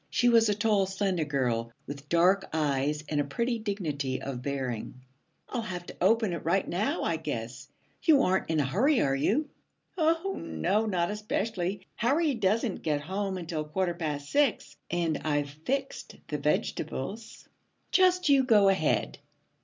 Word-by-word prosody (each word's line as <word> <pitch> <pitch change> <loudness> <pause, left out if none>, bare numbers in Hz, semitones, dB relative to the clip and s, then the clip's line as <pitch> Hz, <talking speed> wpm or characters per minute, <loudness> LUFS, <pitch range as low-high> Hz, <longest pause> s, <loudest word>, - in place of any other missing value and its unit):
She 245 - +3
was 230 -2 +5
a 205 - +2
tall, 205 -2 +2
slender 190 -4 -1
girl, 120 -5 -1
with 145 +1 -9
dark 185 +3 +3
eyes 150 -1 0
and 145 -1 0
a - - 0
pretty 235 - -1
dignity 155 -11 -2
of 130 -3 -5
bearing. 130 -4 -3 0.5
'I'll 245 - -3
have 180 -5 -5
to - - -10
open 220 0 +3
it 170 - -5
right 180 +4 +1
now, 185 +6 -1
I 165 - 0
guess. 130 -5 -5 0.3
You 300 -5 +5
aren't 185 -2 +1
in 160 -1 +1
a 145 - +2
hurry, 235 - +2
are 135 - +2
you?' 285 - +1 0.5
'Oh, 330 +4 +1
no, 195 - 0
not 180 -2 0
especially. 205 -2 -2
Harry 290 +6 +2
doesn't 215 -1 0
get 150 -2 0
home 190 +4 -3
until 165 -3 -3
quarter 175 +4 -1
past 150 -4 -4
six, 285 -5 +1
and 170 -2 0
I've 145 -2 -1
fixed 265 - -4
the 150 - -2
vegetables. 155 - -3 0.4
Just 365 -1 +4
you 275 -2 +5
go 210 -6 +5
ahead.' 190 -6 +1
180 Hz, 160 wpm, -28 LUFS, 150-220 Hz, 0.5 s, was